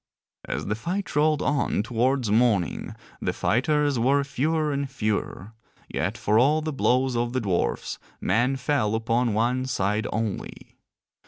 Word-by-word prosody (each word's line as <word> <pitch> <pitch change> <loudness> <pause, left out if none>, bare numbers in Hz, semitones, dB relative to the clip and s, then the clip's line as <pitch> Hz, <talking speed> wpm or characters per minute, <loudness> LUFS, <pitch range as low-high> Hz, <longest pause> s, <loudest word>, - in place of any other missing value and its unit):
_ - - -2
As - - -3
the 105 - -1
fight 175 - -4
rolled 150 0 +3
on 140 -7 +1
towards 120 +1 0
morning 105 - +1 0.3
the - - -1
fighters 145 +1 +1
were 140 +4 +3
fewer 150 +3 0
and 140 0 -2
fewer, 110 -4 -3 0.4
yet - - -2
for 105 +2 +2
all 145 +5 +4
the 155 0 -3
blows 130 -1 +2
of 120 0 -1
the 130 - +1
dwarfs 95 -7 -1 0.2
men 125 +4 +1
fell 130 -5 0
upon 115 0 0
one 125 +4 +1
side 105 -3 0
only. 110 -2 -5
125 Hz, 150 wpm, -25 LUFS, 110-140 Hz, 0.4 s, all